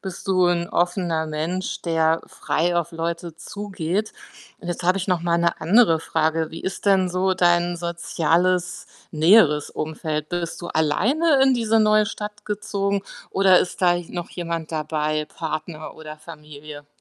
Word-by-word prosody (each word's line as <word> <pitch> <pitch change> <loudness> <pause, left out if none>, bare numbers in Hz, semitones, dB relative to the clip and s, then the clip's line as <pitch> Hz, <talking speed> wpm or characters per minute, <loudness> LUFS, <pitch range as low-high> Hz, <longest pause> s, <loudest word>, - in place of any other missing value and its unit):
bist 190 -1 -8
du 185 -2 +3
'n 170 -1 +1
offener 175 -2 0
Mensch, 165 +5 -3
der 165 -1 +1
frei 175 +2 -1
auf 170 -1 0
Leute 170 0 -4
zugeht 200 +1 -4 0.5
und 175 - -8
jetzt 175 +1 -3
habe 180 +2 +3
ich 195 +1 -3
noch 180 -2 +1
mal 170 0 +1
'ne 170 0 0
andere 170 -1 +4
Frage. 160 0 0
Wie 165 - -8
ist 190 - -5
denn 190 -2 +3
so 185 +1 +1
dein 175 -1 +2
soziales, 170 +1 0 0.2
näheres 155 -2 +4
Umfeld? 155 -1 -4
Bist 175 0 -4
du 175 - -5
alleine 265 - +2
in 265 -1 +5
diese 225 -2 +2
neue 215 0 +4
Stadt 210 -1 -7
gezogen 200 -1 -2 0.3
oder 190 -2 +5
ist 185 - -3
da 175 -1 +5
j 175 -1 -5
noch 175 -1 -5
jemand 170 -2 -5
dabei, 155 -1 -1
Partner 155 -1 -6
oder 155 -1 -9
Familie? 150 -2 -11
175 Hz, 160 wpm, -22 LUFS, 160-190 Hz, 0.5 s, in